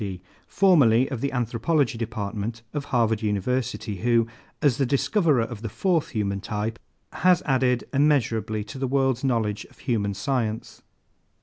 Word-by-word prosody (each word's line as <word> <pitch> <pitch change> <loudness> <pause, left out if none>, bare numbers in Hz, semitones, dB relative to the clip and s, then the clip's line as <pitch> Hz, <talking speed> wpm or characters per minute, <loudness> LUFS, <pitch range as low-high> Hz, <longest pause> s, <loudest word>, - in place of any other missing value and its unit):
D., 95 -3 -5 0.3
formerly 135 - +4
of 125 -4 -4
the 140 - -1
Anthropology 125 +3 0
Department 110 0 -4
of 145 -2 -3
Harvard 115 -3 +1
University, 110 +1 -2
who, 115 +2 +2 0.3
as 140 -6 +2
the 135 - +2
discoverer 145 - +2
of 115 -2 -7
the 115 - -4
fourth 170 - 0
human 100 -3 -2
type, 110 +2 -3 0.3
has 180 -1 +3
added 130 -3 +1
immeasurably 120 -7 +1
to 110 +5 -9
the 135 - -1
world's 135 -1 +1
knowledge 115 -6 0
of - - -21
human 100 -5 -1
science. 110 0 -2
120 Hz, 145 wpm, -25 LUFS, 110-135 Hz, 0.3 s, formerly